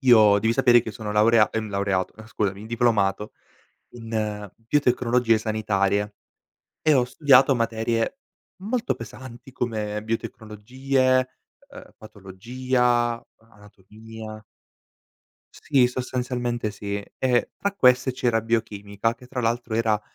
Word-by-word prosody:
io 110 -6 +6
devi 110 +3 +1
sapere 120 0 +5
che 110 - -6
sono 105 -1 -6
laurea 110 +1 +4
ehm, 110 -1 -3
laureato, 100 -2 -1
eh, 110 0 -12
scusami, 105 -1 -3
diplomato 110 -3 0 0.6
in 110 -3 -4
biotecnologie 125 -2 +1
sanitarie 105 -2 -1 0.7
e 155 -1 +4
ho 130 -3 +3
studiato 135 +1 +4
materie 115 - -1 0.4
molto 230 +5 -1
pesanti 120 +2 -11
come 105 -4 -3
biotecnologie, 130 +4 -1 0.4
uhm, 280 0 -13
patologia, 120 +4 -1
anatomia. 110 +1 -13 1.1
Sì, 135 -5 +2
sostanzialmente 125 -2 -3
sì. 100 0 -5 0.2
Ehm, 125 -2 +2
tra 200 - -2
queste 130 -7 +3
c'era 120 -2 0
biochimica, 110 -1 -2
che 125 +1 -16
tra 125 0 -4
l'altro 115 0 -1
era 110 -2 +1
115 Hz, 110 wpm, -24 LUFS, 105-125 Hz, 1.1 s, io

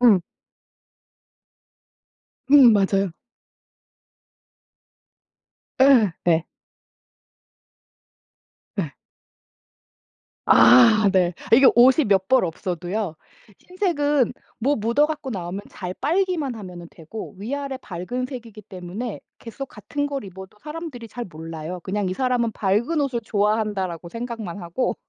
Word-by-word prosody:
응. 225 -7 +6 2.3
음, 265 -6 +8
맞아요. 195 -2 +1 2.7
예. 245 -9 +6
네. 165 -1 +2 2.3
예. 160 -8 -3 1.5
아 125 - +7
네. 180 -2 +2 0.2
이게 260 +3 +7
옷이 260 +5 +6
몇 195 -3 +2
벌 260 -3 +4
없어도요. 175 +2 -4 0.4
흰색은 295 - 0 0.3
뭐 275 +5 +1
묻어 235 +7 +2
갖고 305 -3 -5
나오면 185 0 -5
잘 180 -2 -6
빨기만 335 -4 0
하면은 180 -5 -9
되고 170 +7 -9
위아래 275 +5 -4
밝은 205 +8 -4
색이기 230 -5 -9
때문에 195 +4 -6 0.2
계속 235 +4 -7
같은 285 +1 -4
걸 280 -3 -4
입어도 190 +1 -11
사람들이 300 -6 -7
잘 240 +2 -6
몰라요. 165 +1 -7
그냥 200 +1 -2
이 - - -2
사람은 250 -1 0
'밝은 220 +11 0
옷을 260 -4 -1
좋아한다.'라고 205 -5 -1
생각만 230 -5 -6
하고 175 +9 -2
215 Hz, 210 characters per minute, -23 LUFS, 185-260 Hz, 2.7 s, 음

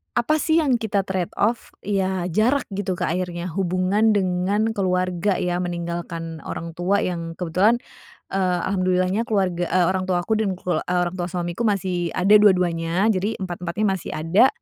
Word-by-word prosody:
apa, 305 +6 +2
sih 320 +1 +2
yang 255 -5 +2
kita 205 -3 0
trade 185 -2 -3
off? 225 +3 -1
Ya, 190 -3 0
jarak, 240 - +2
gitu, 195 -2 -2
Kak, - - -1
akhirnya, 175 -1 -3
hubungan 190 +4 +1
dengan 195 +3 +1
keluarga, 185 -1 0
ya, 180 0 -1
meninggalkan 170 -2 -4
orang 165 0 -5
tua 180 +4 0
yang 165 -2 -3
kebetulan, 185 +6 +2 0.6
eee, 185 -2 +1
alhamdulillahnya 185 +3 +1
keluarga, 180 -5 0
eee, 180 +1 +2
orang 185 0 -2
tua 175 -1 +1
aku, 220 +2 0
dan 200 -4 0
kelu 180 0 -1
eee, 180 0 -1
orang 175 +1 -3
tua 175 - -1
suamiku 175 +5 -2
masih 180 -4 -1
ada 190 +3 +1
dua-duanya, 180 0 +3
jadi 205 +2 -1
empat-empatnya 180 +3 -3
masih - - -7
ada, 165 +10 +4
185 Hz, 165 wpm, -23 LUFS, 175-205 Hz, 0.6 s, ada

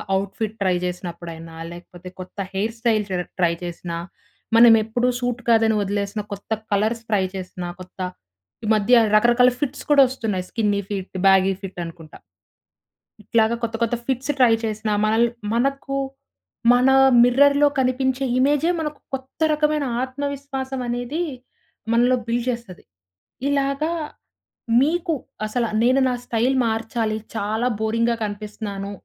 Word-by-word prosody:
Outfit 205 +3 -3
try 185 -2 +2
జేసినప్పుడైనా, 170 -2 -6 0.2
లేకపోతే 175 +1 -11
కొత్త 185 +2 -10 0.2
hair 215 +4 -1
style 225 -3 +2
ట్ర 180 -1 -1 0.2
try 170 -1 +3
చేసినా, 170 -1 -5 0.6
మనం 230 0 +9
ఎప్పుడు 240 +3 0
సూట్ 245 -1 -2
కాదని 225 -1 +4
వదిలేసిన 200 +1 -2
కొత్త 200 - -10 0.2
కలర్స్ 220 +3 0
ట్రై 205 -3 +2
చేసినా, 180 -1 -6
కొత్త 185 +1 -14 0.7
ఈ - - -3
మధ్య 215 +3 +2 0.2
రకరకాల 240 +3 +5
ఫిట్స్ 285 0 -3
కూడా 285 -1 +7
వస్తున్నాయి 215 -8 -3
స్కిన్నీ 205 -3 0
ఫిట్, 195 -2 -5
బ్యాగీ 195 0 +5
ఫిట్ 195 -2 -7
అనుకుంటా. 165 -2 -11 1.1
ఇట్లాగా 220 +2 +2
కొత్త, 225 0 -2
కొత్త 230 +1 0
ఫిట్స్ 265 +2 0
ట్రై 245 -3 +6
చేసినా, 215 0 -2
మనల్ 220 +2 +3 0.3
మనకు 275 +2 -1 0.8
మన 250 +2 +4 0.3
మిర్రర్‌లో 285 +4 +5
కనిపించే 260 +1 +1
ఇమేజే 290 +5 +3
మనకు 300 -1 -4
కొత్త 265 0 -6
రకమైన 300 -1 +1 0.2
ఆత్మవిశ్వాసం 270 -1 -4
అనేది 245 +7 -2 0.7
మనలో 245 +2 +4
బిల్డ్ 235 +1 -1
చేస్తది. 235 -7 -5 0.7
ఇలాగ, 275 0 0 1.0
మీకు 330 +4 +1 0.3
అసలు 230 +2 -1 0.2
నేను 255 +3 +4
నా - - 0
స్టైల్ 240 +3 +1
మార్చాలి 225 0 -1 0.2
చాలా 220 +3 -1
బోరింగ్‌గా 230 +2 +1
కనిపిస్తున్నాను. 205 -1 -5
230 Hz, 125 wpm, -22 LUFS, 200-260 Hz, 1.1 s, మనం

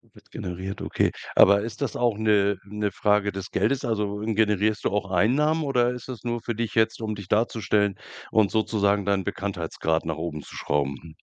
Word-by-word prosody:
Wird - - -19
generiert, 95 +2 -5
okay. - - +1 0.2
Aber 100 +1 +7
ist 115 +5 -6
das 130 -6 -2
auch 120 -4 +1
'ne 100 -2 +3
'ne 105 0 -2
Frage 105 +1 +2
des 95 -1 -6
Geldes? 135 +7 0
Also, 105 -3 -1
generierst 105 -1 +1
du - - +3
auch 100 -2 -1
Einnahmen, 150 - +2
oder 125 -3 +2
ist 125 0 -8
das 125 -3 -7
nur 120 -1 -2
für 115 +1 -3
dich 115 0 -3
jetzt, 110 0 +2
um 110 -1 -2
dich 100 -3 -9
darzustellen 105 -2 +1 0.3
und 110 -3 +3
sozusagen 100 -2 +1
deinen 100 -2 +1
Bekanntheitsgrad 85 -5 -2
nach 80 -1 -2
oben 80 -3 -4
zu - - -12
schrauben, 70 -2 -1
hm? 80 -1 -13
105 Hz, 190 wpm, -25 LUFS, 95-115 Hz, 0.3 s, Aber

